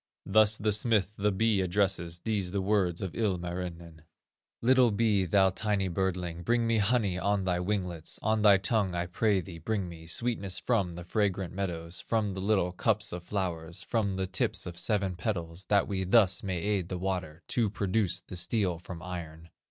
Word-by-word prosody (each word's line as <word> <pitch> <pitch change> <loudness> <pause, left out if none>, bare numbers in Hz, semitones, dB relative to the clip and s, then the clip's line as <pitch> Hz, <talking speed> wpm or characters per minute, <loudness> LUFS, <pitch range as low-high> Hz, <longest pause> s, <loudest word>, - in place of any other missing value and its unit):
"Thus 110 +1 +5
the 105 0 +1
smith 105 -2 +2
the 105 +1 +1
bee 105 0 +2
addresses, 90 -2 0
These 105 -5 -1
the 100 - -1
words 95 -4 +1
of 95 -3 -4
Ilmarinen: 85 -5 -3 0.6
'Little 125 0 +5
bee, 105 -2 +2
thou 95 +1 +4
tiny 100 -1 0
birdling, 90 -2 -2
Bring 120 +6 +1
me 115 -1 +2
honey 100 -4 +1
on 100 0 +1
thy 90 -1 0
winglets, 90 -4 -3
On 110 0 +2
thy 105 -2 +7
tongue, 95 -1 0
I 85 0 -1
pray 95 +2 +1
thee, 85 -1 -9
bring 100 +3 -2
me 80 -1 -10
Sweetness 100 -1 -1
from 95 -2 0
the 85 - -7
fragrant 95 -1 -1
meadows, 85 -3 -4
From 110 -3 0
the 95 - -5
little 95 -3 +2
cups 105 +3 0
of 90 - -5
flowers, 85 -3 -3
From 100 -2 0
the 95 0 -1
tips 95 +1 -1
of 90 -2 -6
seven 100 -4 0
petals, 85 -3 -4
That 100 -1 +3
we 95 -2 -1
thus 95 -1 +4
may 95 -2 -2
aid 95 -1 -1
the 90 - -3
water 90 -3 -3
To 115 -4 +1
produce 100 -2 0
the 90 - -9
steel 90 -1 0
from 85 -1 -9
iron. 85 -2 -7
95 Hz, 185 wpm, -29 LUFS, 90-105 Hz, 0.6 s, thy